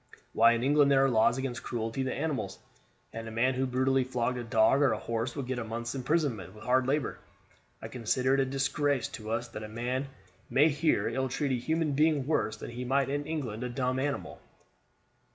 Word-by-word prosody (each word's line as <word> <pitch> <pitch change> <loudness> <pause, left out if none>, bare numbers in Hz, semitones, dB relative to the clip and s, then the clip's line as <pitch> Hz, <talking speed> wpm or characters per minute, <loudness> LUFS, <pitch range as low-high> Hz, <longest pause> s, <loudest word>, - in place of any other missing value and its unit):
Why, 115 +1 +6
in 115 +1 -1
England 145 +1 +4
there 135 0 +5
are 135 - +2
laws 115 +1 +3
against 130 -2 -3
cruelty 115 +2 -3
to 130 - -2
animals; 135 -11 -2 0.6
and 115 0 -6
a - - -6
man 120 +4 +2
who 130 +1 0
brutally 130 +1 +2
flogged 125 0 -1
a - - -4
dog 115 +4 +3
or 140 - +4
a - - -2
horse 115 +1 -3
would 140 -3 -3
get 130 0 -3
a - - -3
month's 115 +2 -4
imprisonment 130 - -1
with 110 - -12
hard 130 +1 +2
labor. 140 -1 -1 0.6
I - - -4
consider 125 +2 0
it 135 - +3
a 135 - +3
disgrace 135 0 0
to 110 -1 -8
us 115 +2 -1
that 110 - -7
a 105 - -7
man 125 +5 -2 0.4
may 150 +4 +5
here 150 +2 +1
ill 130 +2 -1
treat 135 +2 -1
a 125 - 0
human 160 -1 0
being 150 -1 +2
worse 145 -7 0
than - - -7
he 120 +1 -5
might 135 +2 +1
in 145 +1 -2
England 125 -8 -3
a 125 - -3
dumb 130 +1 -1
animal." 140 0 -3
130 Hz, 215 wpm, -30 LUFS, 115-140 Hz, 0.6 s, Why